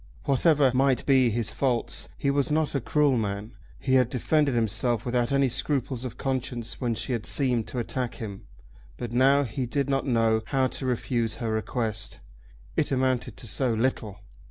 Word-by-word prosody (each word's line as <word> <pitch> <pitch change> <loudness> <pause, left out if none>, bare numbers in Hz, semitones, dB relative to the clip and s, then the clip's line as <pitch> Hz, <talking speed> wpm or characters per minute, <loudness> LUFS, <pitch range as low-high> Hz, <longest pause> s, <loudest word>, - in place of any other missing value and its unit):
Whatever 140 -1 +3
might 130 0 +2
be 130 -3 +4
his 115 -1 -1
faults 125 -4 -1
he 140 - +1
was 140 +1 +1
not 155 0 +1
a 140 - 0
cruel 145 +1 +2
man. 105 +2 -4 0.3
He 130 - -1
had 130 -2 +4
defended 140 +1 +1
himself 115 +1 0
without 120 0 0
any 140 -1 +3
scruples 130 -1 -1
of 125 - -6
conscience 125 -3 -3
when 120 -2 0
she 125 - -3
had 115 -3 -2
seemed 125 -5 +1
to - - -5
attack 125 +1 -2
him, 100 -4 -8 0.5
but 120 - -5
now 135 +3 +4
he 125 +1 -3
did 140 +2 -1
not 135 +1 0
know 115 -3 +2
how 135 -2 +2
to 130 +1 -3
refuse 120 -2 -1
her 115 -2 -3
request. 110 -1 -3 0.6
It 150 - 0
amounted 130 -3 0
to 115 - -7
so 120 +2 0
little! 110 -4 -1
125 Hz, 180 wpm, -26 LUFS, 115-135 Hz, 0.6 s, be